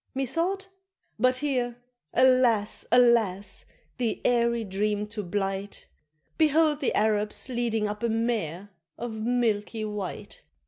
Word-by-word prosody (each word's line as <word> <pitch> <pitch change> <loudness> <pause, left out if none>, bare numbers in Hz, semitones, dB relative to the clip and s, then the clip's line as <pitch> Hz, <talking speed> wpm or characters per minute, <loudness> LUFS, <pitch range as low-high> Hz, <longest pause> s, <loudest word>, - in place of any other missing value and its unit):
Methought 335 +9 -1 0.5
but 255 0 +3
here, 250 -4 -1 0.3
alas! 250 -4 +3
alas! 230 -5 +3 0.3
the 235 -3 -1
airy 235 -1 +2
dream 210 +1 -1
to 210 0 -4
blight, 195 +1 -3 0.5
Behold 310 -1 +4
the 275 - 0
Arabs 210 +2 0
leading 235 -3 0
up 210 +1 -5
a 235 - 0
mare 210 -5 -2 0.3
of 230 -2 -5
milky 225 -2 0
white! 210 -3 -6
230 Hz, 110 wpm, -27 LUFS, 210-250 Hz, 0.5 s, Behold